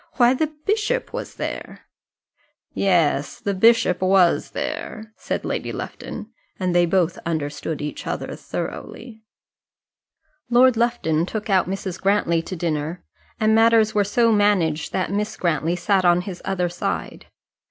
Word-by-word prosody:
Why, 245 Hz, -1 st, +4 dB
the 310 Hz, +4 st, 0 dB, 0.2 s
bishop 435 Hz, +4 st, 0 dB
was -, -, -6 dB
there!" -, -, -6 dB, 0.9 s
"Yes, 165 Hz, -7 st, +1 dB
the 200 Hz, -, -2 dB
bishop 225 Hz, -2 st, +4 dB
was 185 Hz, -2 st, +3 dB
there," 220 Hz, 0 st, -5 dB
said -, -, -4 dB
Lady -, -, -3 dB
Lufton, -, -, -7 dB, 0.3 s
and 185 Hz, -2 st, 0 dB
they 175 Hz, 0 st, +4 dB
both 175 Hz, -1 st, +1 dB
understood 155 Hz, -1 st, -3 dB
each 150 Hz, -, -6 dB
other -, -, -4 dB
thoroughly. 225 Hz, -3 st, -7 dB, 1.3 s
Lord 250 Hz, +1 st, +5 dB
Lufton 225 Hz, -9 st, +1 dB
took 215 Hz, 0 st, -4 dB
out 185 Hz, -2 st, +3 dB
Mrs. 190 Hz, -2 st, -4 dB
Grantly 190 Hz, -4 st, +2 dB
to 185 Hz, -, -6 dB
dinner, 160 Hz, 0 st, -3 dB, 0.4 s
and 215 Hz, -1 st, +3 dB
matters 225 Hz, -1 st, +4 dB
were 205 Hz, -, +3 dB
so 230 Hz, +3 st, +2 dB
managed 195 Hz, -8 st, +2 dB
that 185 Hz, -, -1 dB
Miss 210 Hz, +2 st, -2 dB
Grantly 165 Hz, 0 st, 0 dB
sat 190 Hz, +2 st, +1 dB
on 175 Hz, 0 st, +4 dB
his 185 Hz, -1 st, -7 dB
other 185 Hz, -2 st, -1 dB
side. 175 Hz, +1 st, -4 dB
190 Hz, 140 wpm, -22 LUFS, 170-220 Hz, 1.3 s, Lord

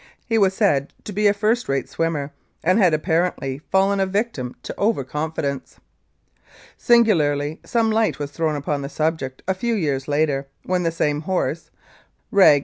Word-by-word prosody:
He 225 Hz, -2 st, +1 dB
was 190 Hz, -2 st, +3 dB
said 145 Hz, -11 st, +1 dB
to 210 Hz, -, -7 dB
be 210 Hz, +2 st, +3 dB
a -, -, +6 dB
first 215 Hz, -, 0 dB
rate 135 Hz, -1 st, 0 dB
swimmer, 155 Hz, -4 st, -2 dB, 0.3 s
and 185 Hz, +6 st, +3 dB
had 185 Hz, -5 st, +5 dB
apparently 155 Hz, -4 st, 0 dB
fallen 195 Hz, +1 st, +3 dB
a 190 Hz, -, +2 dB
victim 190 Hz, -, -2 dB
to -, -, -5 dB
over 210 Hz, -8 st, +1 dB
confidence. 145 Hz, -1 st, -4 dB, 1.0 s
Singularly, 160 Hz, -11 st, +3 dB
some 225 Hz, -2 st, +1 dB
light 220 Hz, 0 st, +1 dB
was 145 Hz, -1 st, -5 dB
thrown 155 Hz, 0 st, -1 dB
upon 145 Hz, 0 st, -2 dB
the 140 Hz, -, -5 dB
subject 155 Hz, -4 st, -2 dB
a 190 Hz, -, +2 dB
few 230 Hz, +5 st, -1 dB
years 145 Hz, -8 st, -1 dB
later, 145 Hz, -2 st, 0 dB, 0.2 s
when 185 Hz, 0 st, 0 dB
the 165 Hz, -1 st, 0 dB
same 150 Hz, -2 st, 0 dB
horse 185 Hz, +3 st, -2 dB, 0.6 s
(reg. 160 Hz, -7 st, +7 dB
165 Hz, 165 wpm, -22 LUFS, 145-200 Hz, 1.0 s, reg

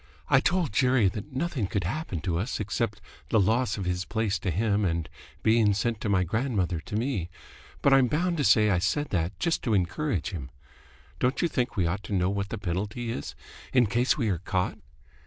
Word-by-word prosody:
"I -, -, +6 dB
told 175 Hz, -, +1 dB
Jerry 125 Hz, -3 st, +4 dB
that 100 Hz, +1 st, -7 dB
nothing 135 Hz, -, -1 dB
could 100 Hz, 0 st, -1 dB
happen 95 Hz, -, -3 dB
to 85 Hz, -2 st, -1 dB
us 110 Hz, +8 st, -2 dB
except 105 Hz, 0 st, -2 dB, 0.3 s
the 110 Hz, -, +3 dB
loss 110 Hz, +3 st, +2 dB
of 100 Hz, -, -3 dB
his 90 Hz, 0 st, -1 dB
place 110 Hz, -1 st, -1 dB
to 100 Hz, -, -2 dB
him 105 Hz, +4 st, +1 dB
and 85 Hz, -3 st, 0 dB, 0.4 s
being 110 Hz, -2 st, +4 dB
sent 115 Hz, +2 st, -1 dB
to 110 Hz, -, -2 dB
my 95 Hz, -2 st, +3 dB
grandmother 100 Hz, -4 st, -1 dB
to 95 Hz, -, -7 dB
me, 110 Hz, -7 st, -1 dB, 0.5 s
but 140 Hz, -, +5 dB
I'm 135 Hz, -2 st, +6 dB
bound 170 Hz, +6 st, 0 dB
to 145 Hz, -, +1 dB
say 105 Hz, -1 st, +5 dB
I 90 Hz, -, +2 dB
said 145 Hz, +10 st, 0 dB
that 90 Hz, 0 st, -1 dB
just 170 Hz, -, +1 dB
to 110 Hz, -4 st, +1 dB
encourage 95 Hz, -, -1 dB
him. 70 Hz, -8 st, -6 dB, 0.7 s
Don't 125 Hz, +6 st, +1 dB
you -, -, +4 dB
think 125 Hz, -6 st, -2 dB
we 90 Hz, -, +2 dB
ought 90 Hz, +5 st, -1 dB
to -, -, -5 dB
know 90 Hz, +1 st, +2 dB
what 100 Hz, 0 st, -2 dB
the 115 Hz, -, -4 dB
penalty 105 Hz, +5 st, -3 dB
is, 70 Hz, -, -5 dB, 0.4 s
in 125 Hz, -2 st, +5 dB
case 120 Hz, +5 st, +1 dB
we 120 Hz, -6 st, 0 dB
are 90 Hz, -4 st, 0 dB
caught?" 90 Hz, 0 st, -2 dB
105 Hz, 210 wpm, -27 LUFS, 95-125 Hz, 0.7 s, I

